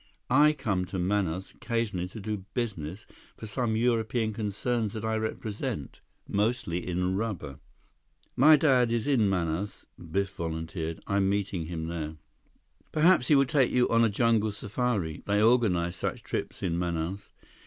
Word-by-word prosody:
I 150 +3 +6
come 100 -10 -1
to 95 - -5
Manaus 95 -1 -1
occasionally 115 -7 -2
to 105 +4 -9
do 105 -2 -4
business 100 - -3 0.3
for - - -8
some 110 +2 -1
European 115 -1 +1
concerns 110 +1 -1
that 110 0 -4
I 110 0 0
represent. 110 - -4 0.3
Mostly 105 -5 -1
in 90 +1 0
rubber." 95 - -4 0.8
"My 155 +1 +8
dad 130 -6 +3
is 115 -1 0
in 125 -8 +3
Manaus," 90 +1 -2 0.2
Biff 95 +3 0
volunteered. 80 -1 -4
"I'm 100 -1 +1
meeting 100 -4 -1
him 80 -2 -4
there." 80 -2 -4 0.8
"Perhaps 155 -4 +4
he 150 - +5
will 135 0 +5
take 135 -2 +3
you 125 0 +3
on 115 0 +4
a 115 - +4
jungle 110 0 +2
safari. 100 -5 -2
They 100 0 +2
organize 105 -7 +3
such - - -3
trips - - -4
in 85 -2 0
Manaus." 85 +3 -3
105 Hz, 150 wpm, -28 LUFS, 90-115 Hz, 0.8 s, My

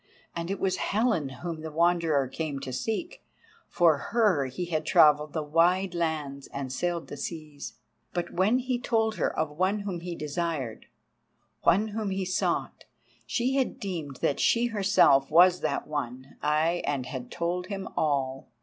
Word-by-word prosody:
And 170 +1 -4
it 195 - -2
was 185 -1 0
Helen 210 - +1
whom 160 +5 -6
the 160 - -5
Wanderer 165 -3 +2
came 145 +1 -4
to 130 -2 -5
seek, 320 - -3 0.4
for 165 -4 +4
her 205 - +3
he 130 +8 -4
had 160 -3 -1
travelled 150 -1 +4
the 155 - -1
wide 175 +5 +2
lands 155 -5 -2
and 135 -2 -5
sailed 170 +3 -2
the - - -7
seas. 150 -1 -6 0.4
But 175 -1 -3
when 200 +7 +3
he 255 -1 -1
told 225 -3 0
her - - +1
of 155 -1 0
one 185 +7 0
whom 195 -4 -4
he 175 0 -5
desired, 150 -6 -3 0.7
one 205 +6 +3
whom 215 -1 -3
he 190 0 -2
sought, 185 0 -1 0.4
she 255 +3 0
had 265 - 0
deemed 165 -8 -4
that 140 - +1
she 235 +1 +3
herself 195 -9 +4
was 180 +3 +6
that - - -1
one, 130 -3 -5
ay, 155 +3 +1
and 140 -3 -1
had 125 -2 -6
told 175 +1 -2
him 195 -2 -5
all. 135 -3 -1
170 Hz, 165 wpm, -28 LUFS, 145-190 Hz, 0.7 s, was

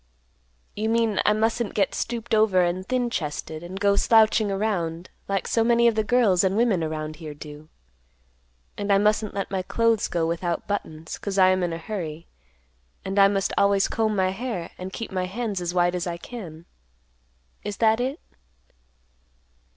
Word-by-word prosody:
You 215 +1 -1
mean 230 -2 +1
I 210 - +5
mustn't 225 +1 0
get 200 -2 +1
stooped 235 0 -3
over 215 -4 +4
and 175 +2 -1
thin 245 -2 0
chested, 155 -2 -4
and 180 +3 -7
go 200 0 +3
slouching 220 0 +4
around, 185 -5 -2 0.2
like 195 -2 -1
so 225 - +2
many 235 0 +4
of 230 - +4
the 220 0 0
girls 210 -6 +3
and 190 +1 +1
women 220 -8 +2
around 155 -1 -4
here 155 -3 -8
do, 150 +1 -11 1.1
and 205 0 -1
I 200 - +6
mustn't 210 +1 +1
let 195 -1 -3
my 190 -1 -1
clothes 230 +3 +1
go 170 -2 -1
without 170 +1 -2
buttons, 160 -6 -4
'cause 200 -1 -4
I 185 -1 +6
am 185 0 +2
in 175 -1 -1
a 165 - -3
hurry, 165 -3 -6 0.8
and 195 +1 0
I 195 - +8
must 195 -1 0
always 200 -1 +3
comb 220 -1 0
my 190 -1 +2
hair, 200 -5 -4
and 185 +1 -6
keep 225 +3 -6
my 185 -1 -1
hands 205 -1 -3
as 175 -1 -2
white 175 0 +2
as 180 -1 -2
I 170 -1 -3
can. 170 -6 -9 1.0
Is 205 - -5
that 220 0 +3
it?" 265 +6 -2
195 Hz, 180 wpm, -24 LUFS, 175-220 Hz, 1.1 s, I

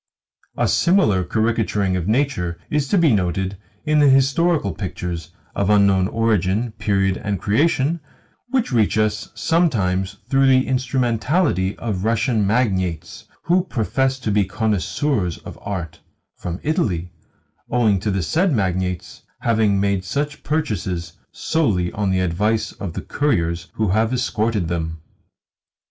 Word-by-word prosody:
A - - +2
similar 140 - +3
caricaturing 110 -2 0
of 90 -1 -2
nature 110 -9 0
is 150 -2 +1
to 200 - +2
be 165 -7 +4
noted 95 0 -1 0.3
in 155 0 +3
the 145 -1 +6
historical 135 - +3
pictures 90 -1 -5 0.2
(of 100 0 0
unknown 100 -3 +4
origin, 110 0 0
period, 95 -2 +1
and 100 -3 -3
creation) 150 - +1 0.5
which 250 - 0
reach 110 -4 +2
us 110 0 0
sometimes 100 - +1
through 135 0 +3
the 130 -1 +4
instrumentality 125 - 0
of 100 -5 -3
Russian 115 -1 +1
magnates 95 -8 -1 0.2
who 180 +1 +2
profess 135 - 0
to 110 - -1
be 105 0 +3
connoisseurs 105 - -1
of - - -11
art 85 -6 -5 0.4
from 90 +1 -5
Italy; 95 - -1 0.6
owing 110 -5 +2
to 105 - -2
the 95 -2 0
said 170 - +1
magnates 90 - -2 0.2
having 110 -4 +2
made 100 -1 0
such 145 +9 -3
purchases 95 - -2 0.2
solely 105 - 0
on 105 -3 -1
the 95 -1 +1
advice 105 +6 0
of 90 -5 -6
the - - -4
couriers 85 - -1
who 110 -3 0
have 110 +4 +2
escorted 110 -6 0
them. 80 -1 -3
105 Hz, 135 wpm, -21 LUFS, 95-130 Hz, 0.6 s, the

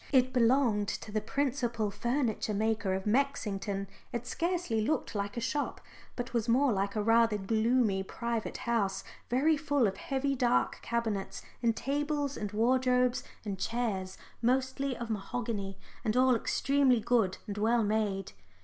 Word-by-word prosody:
It 255 -2 +4
belonged 235 -4 +3
to 210 - -4
the 215 0 0
principal 240 -4 -1
furniture 235 -2 -1
maker 215 -2 0
of 190 - -4
Mexington. 210 -5 0 0.2
It 240 0 -4
scarcely 335 -7 -1
looked 280 +6 -1
like 200 +1 -3
a - - +1
shop, 270 +5 -2 0.4
but 245 0 -5
was 235 -1 0
more 255 +1 +4
like 200 +1 -1
a 210 - 0
rather 225 -1 +4
gloomy 220 0 +2
private 235 +3 -3
house 225 -5 0 0.3
very 285 +6 +3
full 290 -4 +1
of 195 -2 -1
heavy 275 0 -1
dark 245 -1 +1
cabinets 225 -4 -2 0.2
and 230 -2 +2
tables 290 +1 -1
and 210 -2 -4
wardrobes 250 +2 +2 0.2
and 195 -2 -4
chairs, 195 -4 -2 0.2
mostly 260 +2 0
of 235 -1 -4
mahogany, 205 -2 -3 0.3
and 220 0 0
all 255 -1 +5
extremely 275 +1 +2
good 220 -4 +1
and 205 0 -5
well 230 +2 +3
made. 205 -2 0
235 Hz, 150 wpm, -31 LUFS, 210-260 Hz, 0.4 s, all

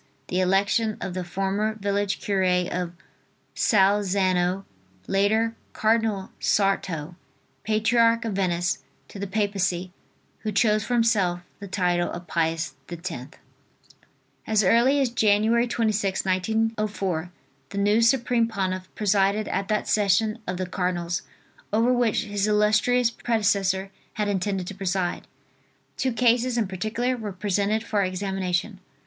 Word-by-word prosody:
the 180 - 0
election 200 +4 +2
of 185 - -4
the 185 0 -3
former 195 +4 -1
village 200 -1 -1
cure 200 -2 0
of 180 -1 0 0.6
Salzano, 195 -2 +2 0.4
later 220 +4 +1 0.2
Cardinal 220 -3 +1
Sarto, 180 -5 0 0.5
patriarch 230 +2 +2
of 220 - -2
Venice, 175 -2 0 0.3
to 200 - -9
the 200 - -3
Papacy, 195 -3 -1 0.5
who 215 - -3
chose 210 +1 +2
for 245 - -1
himself 200 -7 +2 0.2
the 200 - -7
title 180 -2 0
of 175 +1 -7
Pius 165 -2 -1 0.2
X. 175 +1 -5 1.4
As 215 -1 +3
early 240 +8 +4
as 270 -3 +2
Jan. 210 -3 +3
26th, 220 -4 +1
1904, 195 -3 -1 0.4
the - - -7
new 205 +3 +3
supreme 235 -1 +3
pontiff 185 -4 -3
presided 205 0 +2
at 195 0 -2
that 215 -1 -1
session 215 +2 +2
of 180 - -2
the 185 - -2
cardinals 180 -1 -2 0.5
over 230 +4 +3
which 240 -3 +1
his 205 -1 -1
illustrious 215 +3 +3
predecessor 200 -5 0 0.2
had 210 -1 -1
intended 195 -1 -1
to 200 - -6
preside. 190 -2 -2 0.7
Two 260 - 0
cases 240 +1 +2
in 225 -4 +1
particular 220 +7 -2
were 215 -4 -5
presented 205 +3 0
for 215 -3 0
examination. 190 +1 -2
200 Hz, 125 wpm, -25 LUFS, 185-220 Hz, 1.4 s, early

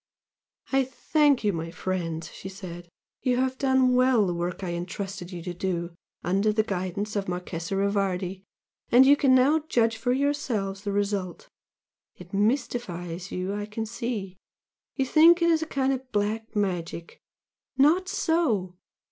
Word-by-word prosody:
"I 270 0 +3
thank 285 +1 +2
you, 205 -2 +2
my 165 0 -4
friends!" 170 -2 -3
she 190 - -8
said 175 -3 -9 0.3
"You 250 -1 +1
have 260 0 0
done 265 -2 +3
well 250 -4 +4
the 180 - -1
work 175 +2 -3
I 180 - -2
entrusted 180 +1 -5
you 175 -2 -7
to 180 0 -4
do 175 -1 -2 0.3
under 195 +4 +2
the 215 +1 +2
guidance 200 +1 -3
of 200 -1 -1
the - - -6
Marchese 180 0 -4
Rivardi, 195 -2 -1 0.5
and 250 +2 +8
you 280 +2 +7
can 270 -2 +4
now 275 +5 +4
judge 230 -1 +2
for 245 +2 0
yourselves 250 -8 -1
the 200 - -1
result 200 -3 -2 0.7
It 180 +1 -14
mystifies 195 -6 -1
you 185 +2 -3
I 205 0 -4
can 220 +1 -4
see! 215 -4 -4 0.6
You 270 - 0
think 330 +5 +6
it 340 0 +3
is 320 -1 +2
a 320 - -3
kind 270 -2 +1
of 260 -1 -6
'black 220 +2 -2
magic'? 175 -4 -3 0.6
Not 335 +7 +4
so! 220 - 0
205 Hz, 160 wpm, -26 LUFS, 180-260 Hz, 0.7 s, and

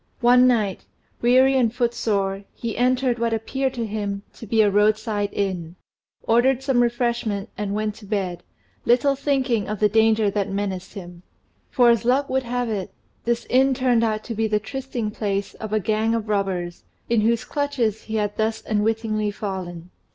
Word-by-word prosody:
One 250 +1 +6
night, 215 -6 0 0.4
weary 260 +3 +5
and 240 -4 +3
footsore, 215 -5 -1
he 230 -2 -4
entered 250 0 +1
what 230 -1 0
appeared 265 +4 -2
to 235 -2 -2
him 205 -2 -3
to 225 - -11
be 220 +1 +4
a 205 - +3
roadside 210 0 +1
inn, 180 -4 -3 0.5
ordered 250 +3 +3
some 265 -3 +2
refreshment, 235 -4 -1
and 205 -1 -3
went 215 0 -1
to 215 -3 -13
bed, 190 -4 -2 0.4
little 255 +4 +3
thinking 265 -6 0
of 210 -1 -3
the 210 - +4
danger 220 -1 +3
that 205 0 -1
menaced 195 -1 -4
him: 175 -3 -9 0.5
for 245 -3 +5
as 235 -1 +1
luck 260 +4 +1
would 265 0 +2
have 245 0 -2
it, 205 -3 -3 0.3
this 235 0 0
inn 265 +1 +3
turned 250 -3 +2
out 215 -1 0
to 235 - -5
be 225 0 0
the 210 -1 +1
trysting 245 -1 -4
place 200 -2 -2
of 215 -1 -7
a 215 - +2
gang 220 +3 0
of 225 -1 -3
robbers, 190 -4 -2 0.2
into 225 -2 +2
whose 235 0 +1
clutches 260 -7 -1
he 220 - -4
had 205 -1 -1
thus 220 0 -1
unwittingly 215 0 0
fallen. 185 -4 -6
220 Hz, 175 wpm, -23 LUFS, 205-240 Hz, 0.5 s, One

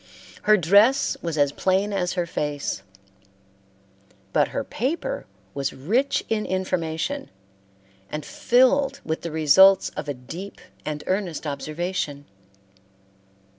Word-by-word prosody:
Her 215 - +8
dress 205 - +4
was 165 -2 -3
as 145 -1 +3
plain 190 +5 +1
as 180 -3 0
her 175 -2 -1
face, 145 -9 -3 1.5
but - - +3
her - - -3
paper 325 - -3 0.3
was 140 -1 -2
rich 230 - 0
in 220 -1 0
information 185 - -2 0.8
and 150 -1 -4
filled 270 +3 +3
with 160 0 -2
the 170 - -4
results 160 +5 +6
of 145 - -6
a 145 - -2
deep 170 +11 -9 0.3
and 150 -1 -4
earnest 185 -5 -2
observation. 150 0 -3
180 Hz, 115 wpm, -24 LUFS, 150-210 Hz, 1.5 s, Her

